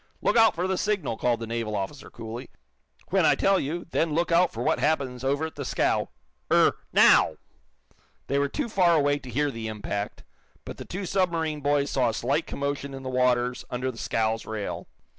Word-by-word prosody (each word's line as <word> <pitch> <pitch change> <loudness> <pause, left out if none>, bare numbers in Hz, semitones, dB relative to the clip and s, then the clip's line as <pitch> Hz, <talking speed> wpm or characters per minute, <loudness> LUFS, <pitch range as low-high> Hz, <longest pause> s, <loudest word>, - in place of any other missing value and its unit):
"Look - - +1
out 225 -1 +5
for 175 +2 -1
the 190 -1 -1
signal," 205 - -1
called 120 0 0
the - - -3
naval 115 -2 -3
officer, 95 -1 -5
coolly. 115 +2 -8 0.6
"When - - +3
I - - +5
tell 195 -1 +3
you, 165 +5 -3
then 160 -2 0
look 170 +1 0
out 170 +1 +4
for 115 - -4
what - - +1
happens 135 -5 0
over 140 +4 0
at 160 - -6
the 145 - -6
scow. - - 0 0.4
Er - - +5 0.2
now!" - - +6 0.9
They 140 +1 0
were 140 0 +1
too - - -2
far 180 -6 +3
away 145 -1 +2
to 130 - -11
hear 145 +4 0
the 115 -3 -5
impact, 105 -1 -4 0.4
but - - -7
the - - -8
two 190 +2 -5
submarine 165 -5 0
boys 145 0 +1
saw 125 -3 +2
a 110 - -3
slight 140 +7 0
commotion 140 -1 -3
in 135 - -8
the 130 - -4
waters 125 -1 +1
under 125 +1 -2
the 115 - -15
scow's 110 0 0
rail. 110 -2 -4
140 Hz, 200 wpm, -26 LUFS, 120-160 Hz, 0.9 s, now